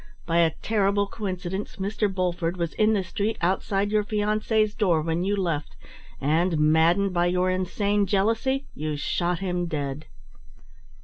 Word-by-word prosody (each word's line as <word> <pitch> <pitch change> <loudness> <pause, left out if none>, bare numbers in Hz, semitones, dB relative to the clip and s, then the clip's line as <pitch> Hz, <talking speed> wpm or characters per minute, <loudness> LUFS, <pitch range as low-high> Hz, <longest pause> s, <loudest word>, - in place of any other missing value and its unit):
By 170 0 +2
a 165 -2 +3
terrible 205 -2 +2
coincidence, 190 -2 -5
Mr. 205 +1 -1
Bulford 180 -2 -1
was 170 -2 -2
in 215 0 +3
the 200 -3 +1
street 205 +5 -2
outside 195 +3 0
your 215 -1 +2
fiancée's 215 +1 0
door 175 -8 +2
when 165 +2 -1
you 200 +2 +1
left, 170 -7 -2 0.4
and 160 +4 +1
maddened 165 +6 +3
by 175 0 +2
your 180 +1 +1
insane 200 +2 0
jealousy, 225 +8 +1
you 155 0 -3
shot 175 +4 -1
him 180 -2 -1
dead. 145 -2 -4
185 Hz, 145 wpm, -25 LUFS, 170-205 Hz, 0.4 s, a